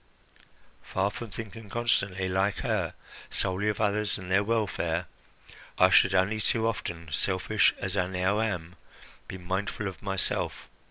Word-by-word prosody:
Far 95 +1 -1
from 120 +1 -7
thinking 110 0 -7
constantly, 100 -5 +1
like 95 +2 +1
her, - - -1 0.3
solely 95 +2 -1
of 105 - -2
others 105 0 +1
and 95 -2 -8
their 95 +2 +4
welfare, 95 -6 0 0.7
I - - +6
should - - +6
only 105 +4 +2
too 110 +1 +2
often, 85 -7 -4
selfish 95 +6 +2
as 95 0 -3
I 90 -2 +1
now 95 +3 +1
am, 90 -5 -3 0.5
be 95 - -6
mindful 95 +3 -3
of 95 -5 -7
myself. 95 -1 -1
95 Hz, 145 wpm, -28 LUFS, 95-105 Hz, 0.7 s, I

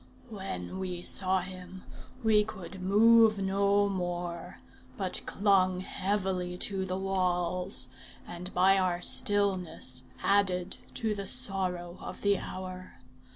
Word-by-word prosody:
When 190 - -6
we 180 -2 -4
saw 190 0 +1
him, 185 0 -10 0.4
we 215 -1 +4
could 190 -2 -9
move 220 +3 +5
no 200 +1 +2
more, 175 -3 -4 0.4
but 185 -2 -1
clung 185 -2 +2
heavily 185 -2 -2
to 190 0 -1
the 185 0 -3
walls, 180 -4 -1 0.4
and 175 +1 -7
by 190 +2 +4
our 180 -1 -1
stillness 185 -10 +1 0.2
added 190 -2 +1 0.2
to 220 -2 -1
the 200 -2 -5
sorrow 180 -3 +3
of - - -8
the 200 -2 +2
hour. 185 0 -8
185 Hz, 115 wpm, -29 LUFS, 180-200 Hz, 0.4 s, move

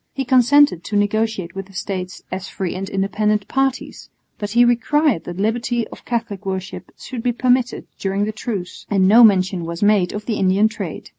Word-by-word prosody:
He 270 0 -2
consented 260 - +4
to 210 - -4
negotiate 205 -3 0
with 195 0 -6
the 195 - -18
States 185 0 -5
"as 185 +1 -5
free 190 -3 -4
and 190 +1 -5
independent" 205 +1 0
parties, 270 -1 -2 0.3
but 205 - -3
he 240 +3 +4
required 240 - +1
that 175 0 -7
liberty 230 +3 -1
of - - -13
Catholic 230 -5 -3
worship 190 -1 -5
should 250 -4 -7
be 245 +1 +1
permitted 250 +1 0
during 195 +1 -1
the 215 - -2
truce, 210 -4 -6
and 195 -2 +3
no 225 +5 +7
mention 185 -4 +3
was 170 +3 -4
made 205 -4 +3
of 210 0 -6
the 225 - -2
Indian 195 +3 +3
trade. 220 - -7
210 Hz, 190 wpm, -20 LUFS, 190-240 Hz, 0.3 s, no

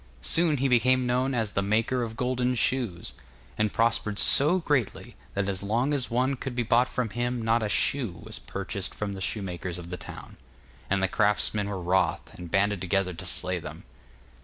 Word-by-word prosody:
Soon 160 - +4
he 135 +1 +1
became 130 0 +3
known 125 +2 0
as 110 -4 0
'The 100 - 0
Maker 110 +5 0
of 115 -1 -5
Gold 125 0 0
Shoes,' 115 -7 -1 0.4
and 105 -1 0
prospered 115 -2 0
so 150 +11 +7
greatly, 145 - -2 0.2
that 100 0 -1
as 95 -2 -1
long 120 +8 0
as 135 -3 -1
one 130 +3 +1
could 130 -1 -6
be 120 - 0
bought 120 +3 +2
from 120 -4 -2
him 120 +1 -2
not 115 +1 +1
a 105 - -2
shoe 120 -1 +1
was - - -5
purchased 95 -2 -4
from 105 -2 -4
the 95 - -7
shoemakers 90 -3 -3
of 85 0 -9
the 90 - -4
town. - - -10 0.5
And 95 0 +1
the - - +3
craftsmen 105 0 +1
were 100 -2 -4
wroth, 90 +2 0
and 90 -1 -9
banded 100 +1 +1
together 95 0 0
to 85 +2 -8
slay 90 +2 -1
them. 75 -1 -9
110 Hz, 190 wpm, -27 LUFS, 95-125 Hz, 0.5 s, so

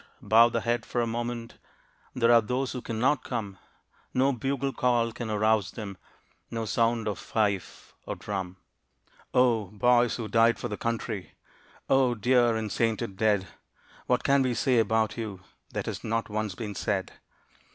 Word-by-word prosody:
bow 115 +2 +6
the - - -1
head 120 -1 0
for 120 - -3
a 120 - +2
moment 120 0 -4 0.6
There 120 -1 +4
are 120 -1 +7
those 125 +4 -2
who 125 - -5
cannot 125 +6 0
come. 105 -6 -4 0.6
No 135 +2 +3
bugle 135 +2 -2
call 120 -2 +1
can 115 0 -6
arouse 105 -1 +2
them 100 -1 -7 0.5
No 115 -1 -3
sound 115 0 +1
of 105 - -2
fife 100 -4 -2
or - - -3
drum. 95 -3 -5 0.7
Oh, 120 -4 +3
boys 120 +4 +2
who 115 -3 -4
died 115 +1 +4
for 120 - -4
the 105 - -3
country, 115 -4 -3 0.5
Oh, 130 -2 +3
dear 120 +1 +3
and 110 -2 -3
sainted 115 -2 -1
dead! 105 -2 +2 0.6
What - - +2
can 140 0 +4
we 130 -2 +1
say 125 +1 +2
about 110 0 +1
you 105 -5 -5 0.3
That - - -3
has - - -5
not 115 +1 -1
once 105 -2 -2
been 105 -1 -5
said? 95 -1 -2
115 Hz, 160 wpm, -28 LUFS, 105-120 Hz, 0.7 s, are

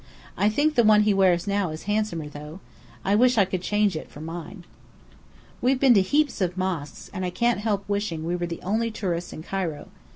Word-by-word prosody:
I 205 - +3
think 290 +8 +1
the 240 -5 +4
one 215 -1 +6
he 210 -1 +3
wears 185 -3 +3
now 200 -3 0
is 155 0 -7
handsomer 205 -7 -1
though. 150 +4 -9 0.5
I 195 - +2
wish 245 +3 +4
I 200 - +5
could 185 -1 -3
change 205 -1 +1
it 155 - -6
for - - -12
mine. 170 +3 -7 1.0
We 250 - +2
have 265 -1 +2
been 265 -2 +6
to 200 - +5
heaps 285 +4 +1
of 180 0 -1
mosques, 175 -6 -4
and 185 -2 -4
I 180 - -1
can't 235 +5 +1
help 205 -2 -1
wishing 200 -6 -2
we 175 +1 -1
were 175 0 -2
the 170 - -7
only 220 +5 0
tourists 175 -5 -3
in 155 - -8
Cairo. 180 -5 -4
195 Hz, 220 wpm, -25 LUFS, 175-215 Hz, 1.0 s, one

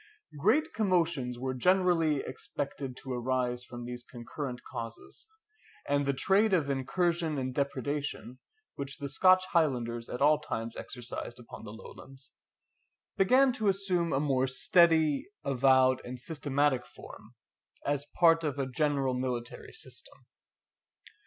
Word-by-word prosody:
Great 300 - +2
commotions 170 - +1
were 130 +1 -3
generally 165 -1 +3
expected 135 0 -5
to 130 - -6
arise 125 0 -1
from 120 -1 -8
these 120 0 -7
concurrent 125 +1 -7
causes; 115 - -8 0.6
and 145 0 +1
the - - +4
trade 195 +9 +2
of 150 -6 +2
incursion 165 +3 0
and 130 -1 -2
depredation, 140 -1 -3 0.3
which 140 -1 -6
the 140 - -4
Scotch 185 +6 +4
Highlanders 120 -8 0
at 125 - -4
all 150 +1 +5
times 115 -6 -5
exercised 120 -1 -6
upon 120 -2 -11
the 105 - -8
Lowlands, 130 +4 -12 0.8
began 255 +7 +4
to 220 -5 -2
assume 185 -4 +1
a 135 - +2
more 135 -3 +1
steady, 160 - +3 0.2
avowed, 130 -1 +4
and 125 0 -7
systematic 145 -2 0
form, - - -13 0.5
as 145 0 -1
part 165 -1 +5
of 145 -3 -2
a 135 - 0
general 135 0 0
military 125 -1 -4
system. 445 +2 -8
140 Hz, 130 wpm, -30 LUFS, 125-165 Hz, 0.8 s, all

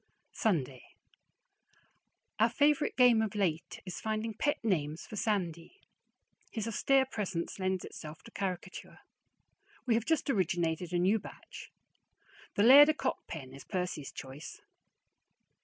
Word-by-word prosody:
Sunday. 140 - 0 1.6
Our 225 +2 +5
favorite 290 +4 +2
game 245 -3 +6
of 220 -2 -2
late 175 -5 -1
is 185 - -6
finding 220 +1 -2
pet 290 +6 0
names 160 -6 -1
for - - -9
Sandy. 195 - -2 0.7
His 220 -2 -4
austere 265 +4 +3
presence 195 -8 -4
lends 185 -1 -1
itself 155 -1 -10
to - - -13
caricature. 185 -1 -5 0.8
We 245 - +2
have 225 0 +1
just 320 -1 +1
originated 175 - 0
a 175 - +1
new 190 +5 +3
batch. - - -11 0.8
The 200 - +3
"Laird 280 +6 +9
o' - - +4
Cockpen" 155 - -4
is 135 - -11
Percy's 180 -6 -4
choice. 135 +3 -9
195 Hz, 125 wpm, -31 LUFS, 170-230 Hz, 1.6 s, Laird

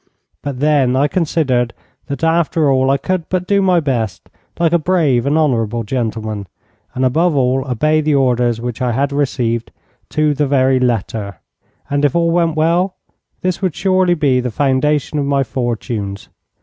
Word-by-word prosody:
But 140 -3 -5
then 145 -4 +3
I 140 +3 +3
considered 140 -7 0 0.3
that 140 +3 -5
after 165 -2 +2
all 130 0 +2
I 135 - +3
could 185 +3 -3
but 185 -1 -1
do 200 +1 +2
my 185 -2 +3
best 120 -9 -3 0.3
like 170 -1 +1
a 170 - +4
brave 150 -8 +1
and 145 +2 +2
honourable 120 -7 0
gentleman, 110 -3 -3 0.5
and 130 +1 +1
above 160 +6 +2
all 130 0 +1
obey 155 +6 +2
the 150 -1 +1
orders 125 -3 +1
which 120 -1 -5
I 125 -2 0
had 140 +4 0
received, 120 -5 -1 0.4
to 155 -1 +1
the 145 0 0
very 130 -1 +3
letter. 110 -5 -2 0.5
And, 145 0 -1
if 145 0 +2
all 170 -1 +2
went 165 -2 +1
well, 170 +4 +1 0.5
this 185 0 -1
would 185 -5 -1
surely 185 -2 +2
be 140 -5 +2
the 125 0 -2
foundation 145 +4 0
of 140 - 0
my 140 -1 +1
fortunes. 115 -6 -4
140 Hz, 170 wpm, -17 LUFS, 125-160 Hz, 0.5 s, a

